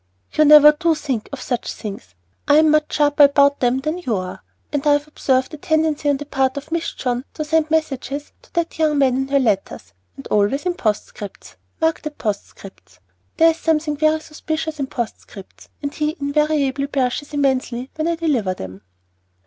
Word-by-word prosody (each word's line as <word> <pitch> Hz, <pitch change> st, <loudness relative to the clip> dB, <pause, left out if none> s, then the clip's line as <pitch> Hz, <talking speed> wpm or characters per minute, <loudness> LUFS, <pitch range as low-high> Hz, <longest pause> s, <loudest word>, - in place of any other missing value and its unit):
"You 305 Hz, -, +4 dB
never 300 Hz, 0 st, +9 dB
do 325 Hz, +2 st, +1 dB
think 270 Hz, -8 st, -3 dB
of 280 Hz, -2 st, -6 dB
such 245 Hz, -2 st, -3 dB
things. 195 Hz, -, -8 dB, 0.3 s
I 290 Hz, -, +5 dB
am 310 Hz, 0 st, +5 dB
much 305 Hz, 0 st, +2 dB
sharper 290 Hz, 0 st, +5 dB
about 280 Hz, 0 st, +3 dB
them 250 Hz, +1 st, +1 dB
than 310 Hz, +5 st, -2 dB
you 250 Hz, -11 st, -1 dB
are, 185 Hz, -1 st, -5 dB, 0.3 s
and 290 Hz, 0 st, -1 dB
I 290 Hz, -, +6 dB
have 290 Hz, +1 st, 0 dB
observed 260 Hz, -2 st, 0 dB
a -, -, -6 dB
tendency 315 Hz, -1 st, 0 dB
on 285 Hz, -, +2 dB
the 290 Hz, -, -7 dB
part 265 Hz, -1 st, 0 dB
of 295 Hz, +3 st, -7 dB
Miss 330 Hz, 0 st, -1 dB
John 245 Hz, -1 st, -2 dB
to 310 Hz, -, -3 dB
send 315 Hz, 0 st, +1 dB
messages 290 Hz, -2 st, -2 dB
to -, -, -24 dB
that 340 Hz, -2 st, -2 dB
young 305 Hz, -2 st, +2 dB
man 265 Hz, -3 st, +3 dB
in 265 Hz, +1 st, -1 dB
her 280 Hz, +1 st, +2 dB
letters, 215 Hz, -8 st, -1 dB, 0.2 s
and 135 Hz, -, -10 dB
always 210 Hz, -, +1 dB
in 360 Hz, -, +1 dB
postscripts. 210 Hz, -, -4 dB, 0.2 s
Mark 320 Hz, 0 st, +1 dB
that, 305 Hz, -1 st, -7 dB
postscripts! 195 Hz, -, -6 dB, 0.4 s
There 330 Hz, 0 st, +6 dB
is 320 Hz, -, -8 dB
something 310 Hz, -2 st, 0 dB
very 310 Hz, +1 st, +2 dB
suspicious 315 Hz, 0 st, -5 dB
in 275 Hz, -, -1 dB
postscripts, 220 Hz, -5 st, -7 dB
and 285 Hz, 0 st, -3 dB
he 305 Hz, +1 st, -1 dB
invariably 285 Hz, -1 st, 0 dB
blushes 275 Hz, +1 st, -2 dB
immensely 260 Hz, -3 st, -1 dB
when 315 Hz, +1 st, -2 dB
I 335 Hz, -, +1 dB
deliver 265 Hz, -, 0 dB
them." 95 Hz, -, -9 dB
285 Hz, 190 wpm, -20 LUFS, 255-310 Hz, 0.4 s, never